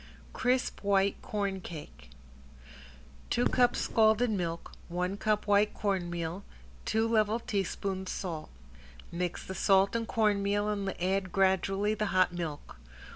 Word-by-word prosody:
~CRISP 255 0 0
WHITE 200 -1 +2
CORNCAKE~ 185 - -5 1.2
Two 240 - +1
cups 245 -1 +3
scalded 220 +1 +3
milk, 170 -4 -3 0.2
one 180 +2 -2
cup 210 0 0
white 205 0 +3
cornmeal, 175 -2 -2 0.4
two 220 +1 +1
level 220 -1 +2
teaspoons 195 -3 -3
salt. 160 -5 -5 0.6
Mix 175 0 -3
the 190 - -5
salt 195 +2 +3
and 230 -1 -1
cornmeal 205 -2 +1
and 200 -2 -3
add 185 +1 0
gradually 195 +2 +2
the 215 0 -1
hot 185 0 +2
milk. 160 - -6
195 Hz, 120 wpm, -30 LUFS, 180-215 Hz, 1.2 s, cups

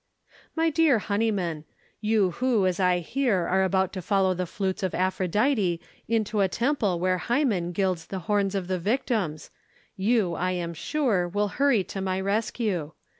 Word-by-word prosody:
My 325 0 +2
dear 300 -4 +4
Honeyman, 200 -7 -1 0.4
you 210 -3 +2
who, 240 -1 +1
as 185 0 0
I 180 -1 +3
hear, 220 - 0
are 190 +1 +2
about 190 0 +1
to 185 - -4
follow 190 0 +2
the 180 0 -3
flutes 190 +1 -3
of 190 -2 -1
Aphrodite 185 +1 +1 0.3
into 215 -2 0
a 195 - +4
temple 220 - 0
where 185 +1 +1
Hymen 220 - 0
gilds 180 -3 -1
the 190 -1 -5
horns 200 -1 +1
of 190 -3 -2
the 185 -1 -1
victims 205 - -1 0.4
—you, 200 -2 +1
I 185 +2 -1
am 170 -1 -3
sure, 210 - 0
will 205 +3 -1
hurry 270 -2 +2
to 195 - -6
my 190 0 -1
rescue. 200 -5 -1
195 Hz, 165 wpm, -26 LUFS, 180-225 Hz, 0.4 s, dear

